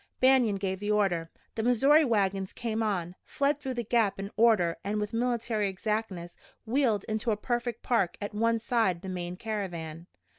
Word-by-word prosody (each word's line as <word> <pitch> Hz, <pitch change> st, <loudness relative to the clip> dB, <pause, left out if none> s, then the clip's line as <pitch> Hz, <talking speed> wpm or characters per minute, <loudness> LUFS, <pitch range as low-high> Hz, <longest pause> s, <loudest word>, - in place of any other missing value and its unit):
Banion 255 Hz, -5 st, +4 dB
gave 190 Hz, -1 st, -2 dB
the 205 Hz, +1 st, -4 dB
order. 190 Hz, -6 st, +1 dB, 0.2 s
The 220 Hz, -, -2 dB
Missouri 270 Hz, +7 st, +5 dB
wagons 195 Hz, -6 st, 0 dB
came 225 Hz, -2 st, -2 dB
on, 180 Hz, -5 st, -1 dB
filed 285 Hz, +1 st, 0 dB
through 265 Hz, -3 st, -4 dB
the 240 Hz, -, -2 dB
gap 225 Hz, -2 st, +1 dB
in 200 Hz, +1 st, -5 dB
order 215 Hz, -7 st, +3 dB
and 205 Hz, +2 st, -1 dB
with 210 Hz, +1 st, -3 dB
military 230 Hz, -3 st, 0 dB
exactness 190 Hz, -3 st, -3 dB, 0.3 s
wheeled 230 Hz, -4 st, +1 dB
into 220 Hz, +1 st, -2 dB
a 210 Hz, -, +1 dB
perfect 240 Hz, +1 st, -2 dB
park 195 Hz, -8 st, +1 dB
at 205 Hz, 0 st, -5 dB
one 230 Hz, +2 st, +2 dB
side 220 Hz, -6 st, 0 dB
the 190 Hz, -, -5 dB
main 180 Hz, -1 st, -4 dB
caravan. 175 Hz, -7 st, -5 dB
215 Hz, 175 wpm, -29 LUFS, 190-235 Hz, 0.3 s, Missouri